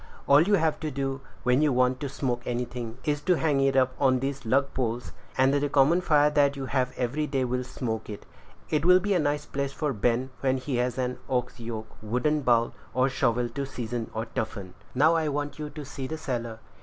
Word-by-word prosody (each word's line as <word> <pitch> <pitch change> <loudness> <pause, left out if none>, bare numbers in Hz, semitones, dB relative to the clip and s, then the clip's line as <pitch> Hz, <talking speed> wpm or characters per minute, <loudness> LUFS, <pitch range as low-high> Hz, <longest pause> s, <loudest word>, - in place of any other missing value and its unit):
All 140 +1 +6
you 200 +5 +4
have 160 -4 +1
to 155 - -3
do, 135 -1 -3 0.2
when 125 +3 +3
you 150 -1 +3
want 125 0 +2
to 140 - -3
smoke 125 -3 -2
anything, 120 -1 -4
is 145 -1 0
to 180 +3 +3
hang 150 -4 +1
it 135 0 +2
up 130 -1 +3
on 130 -2 +4
these 135 -2 -4
lug 135 +4 +2
poles, 120 -1 -2 0.3
and 130 +1 +4
the 145 0 +1
common 145 +6 +4
fire 150 -4 +4 0.2
you 135 -1 -4
have 130 0 0
every 140 +5 -1
day 135 -2 0
will 125 +1 -1
smoke 120 -4 -4
it. 105 - -7 0.5
It'll 175 +4 +5
be 200 +2 0
a 180 - +3
nice 145 -1 0
place 140 -1 -3
for 150 -1 -1
Ben, 120 +4 0
when 130 -1 +1
he 130 0 -3
has 125 0 0
an 125 -1 -2
ox 125 -2 -1
yoke, 110 -1 -6
wooden 125 +8 0
bowl, 120 -3 +2 0.2
or 130 +1 +3
shovel 125 -2 +1
to 140 - -4
season 120 -3 -4
or 110 +1 -2
toughen. 105 -4 -5 0.2
Now 155 +5 +5
I 160 -2 +1
want 145 +1 -3
you 150 -1 -4
to 150 0 -8
see 135 -1 -6
the 160 - -4
cellar." 120 -6 -3
135 Hz, 215 wpm, -27 LUFS, 125-145 Hz, 0.5 s, All